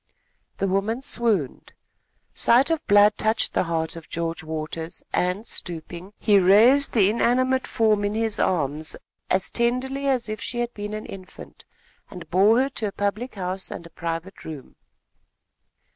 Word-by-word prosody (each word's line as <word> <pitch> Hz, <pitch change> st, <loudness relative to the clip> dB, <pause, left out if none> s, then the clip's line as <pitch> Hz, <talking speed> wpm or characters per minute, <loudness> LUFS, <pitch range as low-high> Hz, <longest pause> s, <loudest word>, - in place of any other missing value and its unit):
The 195 Hz, -, 0 dB
woman 200 Hz, +6 st, 0 dB
swooned. 220 Hz, -, -1 dB, 0.6 s
Sight 260 Hz, +7 st, +3 dB
of 325 Hz, -2 st, 0 dB
blood 205 Hz, +1 st, +5 dB
touched 220 Hz, +1 st, +1 dB
the -, -, +1 dB
heart 165 Hz, -1 st, -2 dB
of 165 Hz, -1 st, -11 dB
George 165 Hz, 0 st, -3 dB
Waters, 160 Hz, +1 st, -5 dB
and, 180 Hz, +5 st, 0 dB
stooping, 175 Hz, 0 st, -6 dB
he 205 Hz, -2 st, +4 dB
raised 225 Hz, +10 st, +5 dB
the 205 Hz, -5 st, +5 dB
inanimate 255 Hz, +3 st, +1 dB
form 215 Hz, -2 st, +2 dB
in 205 Hz, +1 st, -1 dB
his 225 Hz, -1 st, -1 dB
arms, 155 Hz, -2 st, -1 dB, 0.3 s
as 190 Hz, 0 st, 0 dB
tenderly 260 Hz, +4 st, 0 dB
as 255 Hz, -4 st, +1 dB
if 215 Hz, -1 st, -5 dB
she 240 Hz, -, -4 dB
had 240 Hz, 0 st, -2 dB
been 210 Hz, 0 st, -5 dB
an 215 Hz, -, -6 dB
infant, 185 Hz, -1 st, -11 dB, 0.4 s
and 180 Hz, -2 st, -10 dB
bore 210 Hz, +7 st, +5 dB
her 270 Hz, -, 0 dB
to 225 Hz, -5 st, -2 dB
a -, -, -4 dB
public 205 Hz, +6 st, -3 dB
house 185 Hz, 0 st, -4 dB
and 170 Hz, -, -7 dB
a 170 Hz, -, -13 dB
private 165 Hz, +3 st, -5 dB
room. 150 Hz, -5 st, -9 dB
205 Hz, 160 wpm, -24 LUFS, 175-235 Hz, 0.6 s, blood